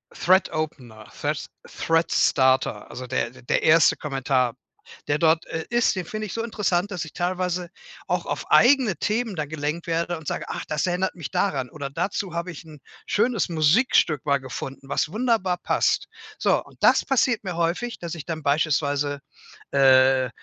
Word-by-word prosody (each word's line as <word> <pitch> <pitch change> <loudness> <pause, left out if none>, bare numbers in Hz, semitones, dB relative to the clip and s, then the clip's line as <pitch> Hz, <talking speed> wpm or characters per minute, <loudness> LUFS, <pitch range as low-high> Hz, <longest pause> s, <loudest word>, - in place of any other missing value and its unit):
Thread-Opener, 155 - 0
Thread - - -2 0.2
Thread-Starter, 135 -5 +1
also 125 - -7
d 125 -1 -1
der - - 0
erste 160 +1 +5
Kommentar, 135 -4 0 0.5
der 145 +1 +1
dort, 160 0 +3
äh, 160 - -4
ist, 240 -2 +2
den 185 -3 -3
finde 215 +3 -5
ich 185 - -7
so 230 - -2
interessant, 205 -4 0
dass 175 -4 -3
ich 155 - -12
teilweise 180 -1 -2 0.4
auch - - -1
auf - - -4
eigene 250 -7 +5
Themen 220 -1 -1
da 155 -3 -2
gelenkt 155 +3 -4
werde 170 0 -1
und 155 -2 -12
sage: - - -3
„Ach, - - -5
das 150 +3 -1
erinnert 180 +1 -1
mich 170 -5 -6
daran.“ 180 -9 0
Oder: 140 -2 -6
„Dazu 175 +3 -3
habe 170 +1 -3
ich 175 - -10
'n 155 -2 -13 0.3
schönes 225 -1 +1
Musikstück 155 - +3
mal 140 -1 +2
gefunden, 135 +1 -8
was 150 - 0
wunderbar 215 -5 +1
passt.“ - - +1 0.3
So, - - +2
und - - -18
das - - +4
passiert 255 -4 +1
mir 185 -3 -4
häufig, 175 +9 -1
dass 170 -1 -5
ich 160 - -8
dann 165 -2 -4
beispielsweise, 145 -1 +1 0.5
äh 130 -1 +5
165 Hz, 165 wpm, -24 LUFS, 145-185 Hz, 0.5 s, erste